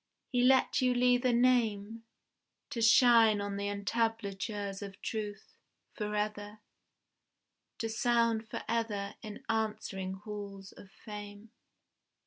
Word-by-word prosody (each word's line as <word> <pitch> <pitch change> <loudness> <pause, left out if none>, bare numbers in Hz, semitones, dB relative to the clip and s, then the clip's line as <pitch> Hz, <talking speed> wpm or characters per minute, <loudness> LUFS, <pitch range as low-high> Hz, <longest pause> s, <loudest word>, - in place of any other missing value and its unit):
He 245 -2 +2
let 260 +1 +4
you 250 -1 +2
leave 245 0 +3
a 250 - +4
name 230 -3 +1 0.7
To 235 - -3
shine 230 -2 +6
on 200 0 -3
the 200 0 -2
entablatures 205 -1 -2
of 200 -1 -8
truth, 210 -2 -5 0.4
Forever: 210 0 -3 1.2
To 225 - -2
sound 230 -1 +1
forever 215 -3 -2
in 210 -1 -9
answering 215 -4 -2
halls 200 -1 -8
of 195 - -14
fame. 205 +1 -10
215 Hz, 110 wpm, -32 LUFS, 205-230 Hz, 1.2 s, shine